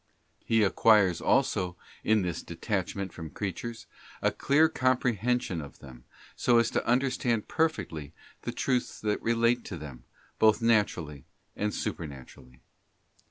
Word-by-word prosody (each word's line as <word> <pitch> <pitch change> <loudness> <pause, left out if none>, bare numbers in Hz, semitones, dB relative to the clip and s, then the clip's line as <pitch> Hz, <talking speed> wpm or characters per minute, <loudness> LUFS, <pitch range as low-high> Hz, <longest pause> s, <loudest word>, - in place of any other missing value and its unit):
He 115 -1 +3
acquires 100 -3 +4
also 95 -9 +1 0.3
in 110 -2 +3
this 90 -2 -3
detachment 100 -2 -3
from 80 -2 -7
creatures 110 +6 -5 0.3
a - - +2
clear 150 +3 +3
comprehension 125 - 0
of 70 - -11
them, 65 -2 -13 0.3
so 120 -2 +3
as 115 0 +3
to - - 0
understand 125 -3 +1
perfectly 85 - -1 0.3
the - - -4
truths 125 -2 -1
that 105 -1 -1
relate 115 +1 +2
to 90 - -6
them, 70 -6 -10 0.3
both 110 -1 +5
naturally 100 - +1 0.3
and 105 +1 -1
supernaturally. 65 -7 -7
105 Hz, 125 wpm, -29 LUFS, 85-120 Hz, 0.3 s, both